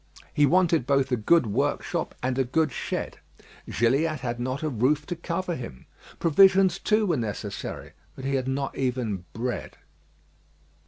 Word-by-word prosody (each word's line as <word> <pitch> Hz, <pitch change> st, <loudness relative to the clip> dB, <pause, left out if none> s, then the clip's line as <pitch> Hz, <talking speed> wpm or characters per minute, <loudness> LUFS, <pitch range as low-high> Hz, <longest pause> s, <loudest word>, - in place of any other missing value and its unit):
He 145 Hz, -1 st, +4 dB
wanted 170 Hz, -4 st, +3 dB
both 135 Hz, -1 st, +2 dB
a -, -, +4 dB
good 130 Hz, +7 st, +3 dB
workshop 105 Hz, -, -1 dB
and 130 Hz, +1 st, 0 dB
a -, -, +4 dB
good 155 Hz, +4 st, +1 dB
shed; -, -, -4 dB, 0.5 s
Gilliatt 140 Hz, +6 st, +1 dB
had 120 Hz, -2 st, -3 dB
not 130 Hz, +4 st, -3 dB
a 155 Hz, -, 0 dB
roof 140 Hz, +4 st, +1 dB
to 175 Hz, -, -4 dB
cover 170 Hz, +1 st, -3 dB
him. 115 Hz, -, -8 dB, 0.3 s
Provisions, 190 Hz, +2 st, +5 dB
too, 215 Hz, +1 st, +2 dB
were 170 Hz, -6 st, +1 dB
necessary, 105 Hz, -3 st, -5 dB, 0.2 s
but 130 Hz, -, -8 dB
he 135 Hz, -, -1 dB
had 130 Hz, -1 st, 0 dB
not 135 Hz, +1 st, -2 dB
even 125 Hz, -8 st, -2 dB
bread. 120 Hz, +2 st, -4 dB
135 Hz, 155 wpm, -26 LUFS, 125-165 Hz, 0.5 s, Provisions